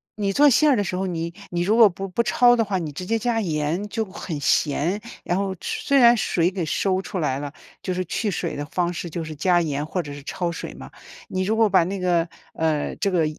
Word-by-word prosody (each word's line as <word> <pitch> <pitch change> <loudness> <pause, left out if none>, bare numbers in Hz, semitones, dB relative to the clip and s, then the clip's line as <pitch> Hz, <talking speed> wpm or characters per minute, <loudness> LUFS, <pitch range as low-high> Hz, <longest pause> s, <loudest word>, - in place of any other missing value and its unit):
你 200 -2 -1
做 290 +4 +6
馅 300 +5 +4
儿 - - +4
的 205 - +1
时 180 - -3
候， 190 +1 -1
你 170 -1 -3 0.2
你 175 -1 -1
如 205 +6 +2
果 225 -3 +8
不 195 +2 -6
不 235 +6 0
焯 245 +1 +5
的 230 - +2
话， 195 -2 -1
你 160 -4 -4
直 165 +6 -6
接 225 +4 +1
加 230 0 0
盐 165 +2 -1
就 225 +1 -1
会 190 - -16
很 160 -5 -4
咸， 155 +7 +1 0.2
然 175 - 0
后 195 -1 -1
吃 - - -5
虽 280 - +4
然 240 -2 +7
水 175 -3 +1
给 185 -3 -3
收 185 +4 0
出 190 - -5
来 135 -4 0
了， 145 0 -6 0.3
就 185 - -2
是 185 +1 -1
去 210 +5 -2
水 - - -3
的 145 - -4
方 175 +3 -1
式 175 0 -5
就 165 +1 -4
是 155 -1 -7
加 175 +3 +3
盐 150 -3 -2
或 180 +3 -2
者 145 -2 -8
是 145 - -9
焯 175 +4 -3
水 165 - -6
嘛。 - - -11 0.4
你 185 0 -1
如 215 +4 0
果 225 -1 +4
把 190 -3 +4
那 195 +3 -3
个， 175 -2 +1 0.3
呃， 155 -2 -1
这 200 - 0
个 170 -3 +2
180 Hz, 280 characters per minute, -23 LUFS, 165-205 Hz, 0.4 s, 果